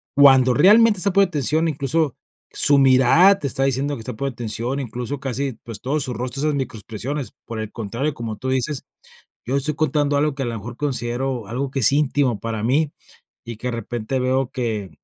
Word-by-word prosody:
Cuando 135 -3 +6
realmente 210 - +6
está 200 +2 +1
poniéndote 185 -5 +2
atención, 155 +5 +1
incluso, 145 -1 0 0.4
su 145 - +4
mirada 135 +9 +5
te 140 - -2
está 135 - -1
diciendo 135 +2 0
que - - -9
está 125 +3 -6
poniendo 135 +2 -3
atención, 120 +3 -3
incluso, 125 +2 -5
casi, 135 0 -3
pues, 115 -3 -8
todo 140 +4 -1
su 130 -3 -3
rostro, 125 +3 -4
esas 150 0 +1
micro 130 -4 -3
expresiones. 120 +7 -5
Por 115 -1 -6
el 110 0 -5
contrario, 120 +7 -3
como 115 -4 -6
tú 130 +5 -4
dices, 130 +2 -1 0.6
yo 130 +3 -1
estoy 145 +2 -1
contando 145 -1 +1
algo 150 0 +1
que 135 - -4
a - - -3
lo 120 - -3
mejor 115 +3 -8
considero 125 -3 -2
algo 130 +6 -3
que 135 - -2
es 125 - +4
íntimo 140 -5 +1
para 115 -2 -4
mí, 140 +6 +1 0.5
y 115 -1 -7
que 125 +3 -4
de - - -2
repente 115 +2 -3
veo 130 0 0
que, 110 -7 -3
130 Hz, 205 wpm, -21 LUFS, 120-145 Hz, 0.6 s, Cuando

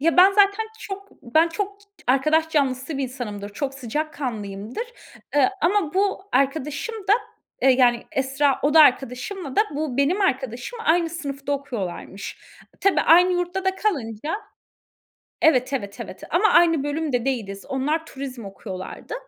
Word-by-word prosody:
Ya, 330 +3 +2
ben 370 +2 +8
zaten 405 +2 +3
çok 395 -1 -7
ben 315 +7 +3
çok 400 +3 -4 0.3
arkadaş 305 +5 +3
canlısı 275 -1 0
bir - - -1
insanımdır. 235 -6 -5
Çok 275 +1 -3
sıcak 285 +4 -3
kanlıyımdır. 215 - -4 0.5
Iıı, 290 +7 +5
ama 360 -3 +2
bu 390 0 +1
arkadaşım 285 - 0
da, - - +6 0.5
eee, 265 - +6
yani, 245 -2 +4
Esra, 270 +1 +1
oda 300 +3 +6
arkadaşımla 270 - +2
da - - +6
bu 290 -4 -2
benim 290 +9 +2
arkadaşım 265 - -1
aynı 335 0 +3
sınıfta 285 -4 -4
okuyorlarmış. 220 -8 -5 0.4
Tabii 395 -1 +3
aynı 355 +2 +6
yurtta 355 +2 -2
da 380 0 +1
kalınca 290 - -2 1.1
Evet, 260 -4 +4
evet, 205 -4 -4
evet. 195 -4 -8
Ama 390 +6 +4
aynı 330 -6 +5
bölümde 290 -5 -1
değiliz. 210 -7 -3
Onlar 300 +5 -1
turizm 265 -5 -7
okuyorlardı. 195 -1 -7
280 Hz, 140 wpm, -23 LUFS, 250-340 Hz, 1.1 s, ben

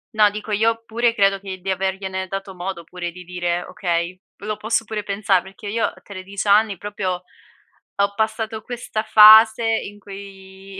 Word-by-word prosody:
No 210 -1 +5
dico 210 +1 -7
io 225 +2 +1
pure 230 +1 +1
credo 195 -2 +2
che 190 -1 -7
di 190 - -6
avergliene 190 0 -3
dato 195 0 -6
modo 180 -1 -5
pure 175 -1 -6
di 180 +1 -11
dire: 175 0 -2
"Okay". 175 -2 -2 0.2
Lo 210 +1 -4
posso 225 +1 -1
pure 215 -1 -4
pensar 200 -2 +1
perché 200 +3 -11
io 225 +2 0
a - - -6
13 200 +1 -7
anni 205 -1 +4
proprio 190 -3 -4 0.7
ho 200 0 +1
passato 220 0 -2
questa 230 -2 -4
fase 220 +1 +8
in 205 -2 -2
cui 195 -1 -11
200 Hz, 165 wpm, -21 LUFS, 190-215 Hz, 0.7 s, fase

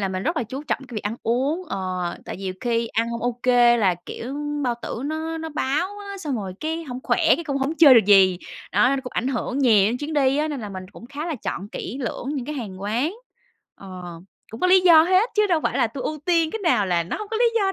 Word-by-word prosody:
là 195 - 0
mình 185 0 -3
rất 325 - -1
là 310 - +1
chú 260 +6 -6
trọng 300 - -1
cái 240 - -10
việc 215 - -3
ăn 210 +3 -3
uống, 270 +9 0
ờ, - - -3 0.5
tại - - -6
vì 195 - -10
nhiều 185 -1 -3
khi 235 -1 0
ăn 230 +1 -1
hông 235 - -4
OK 245 +1 -3 0.3
là, 190 -4 +3
kiểu, 255 +4 -6 0.3
bao 240 -1 +1
tử 235 - -5
nó 320 +1 -3
nó 320 - -5
báo 315 +7 -2
á, 400 -1 -8
xong 300 -8 -3
rồi 195 -4 -5
cái 320 +2 -3
hổng 250 -3 -6
khỏe - - +1 0.2
cái 340 - -6
cũng 280 -3 -2
hổng 275 +4 -1
chơi 290 -5 +9
được 230 - +6
gì. 190 -3 +6 0.3
Đó, 250 - +4
nó 275 - +1
cũng 250 - -7
ảnh 250 - -1
hưởng 255 0 -2
nhiều 220 -8 +5
đến 245 - -2
chuyến 295 +3 -5
đi 275 -2 +2
á, 305 - 0
nên 285 -5 -4
là 210 - -6
mình 185 -2 -7
cũng 235 - -12
khá 285 +5 -6
là 335 - -2
chọn 200 -4 -5
kỹ 250 - -6
lưỡng 245 +1 -4
những 265 -4 -3
cái 300 - -4
hàng 200 -8 -6
quán 240 - -1 0.6
ờ. 185 -2 -10 0.5
Cũng 225 - -8
có 365 - +3
lý 370 0 +6
do 335 -3 +7
hết 375 +7 +3
chứ 425 0 +3
đâu 340 -5 +2
phải - - -1
là - - +3
tui 255 +4 -7
ưu 310 - -3
tiên 335 -3 +2
cái 445 - -4
nào 250 - +2
là 175 -2 +1
nó 170 - -4
hông 425 - -7
có 445 - -1
lý 475 - +3
do 390 -3 +2
265 Hz, 275 wpm, -23 LUFS, 225-320 Hz, 0.6 s, chơi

